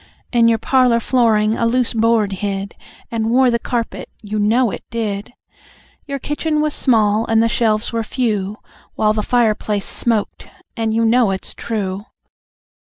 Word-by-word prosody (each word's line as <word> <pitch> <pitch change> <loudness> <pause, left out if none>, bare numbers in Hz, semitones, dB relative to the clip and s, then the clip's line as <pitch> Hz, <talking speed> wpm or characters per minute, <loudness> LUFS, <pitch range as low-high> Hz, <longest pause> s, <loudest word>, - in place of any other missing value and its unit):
"In 235 -1 +4
your 230 -1 +3
parlour 250 +1 +3
flooring 220 -3 +2
a 230 - 0
loose 245 +1 +1
board 225 -2 +2
hid, 195 0 -3 0.4
And 225 -1 -1
wore 250 +1 +4
the 235 - +1
carpet, 235 -1 -4
you 210 +1 -3
know 225 +2 +2
it - - -7
did! 215 -1 -4 0.7
Your 280 -1 -3
kitchen 300 +2 -2
was 305 -1 0
small, 220 -5 +2
and 225 0 +3
the - - +3
shelves 225 -1 0
were 230 - 0
few, 215 -4 -2 0.4
While 215 0 +2
the 215 - -1
fireplace 215 -3 0
smoked 225 -3 -2 0.3
and 225 -2 -1
you 225 +1 +1
know 235 -1 +3
it's 190 0 -5
true!" 205 -2 -4
225 Hz, 160 wpm, -18 LUFS, 210-240 Hz, 0.7 s, In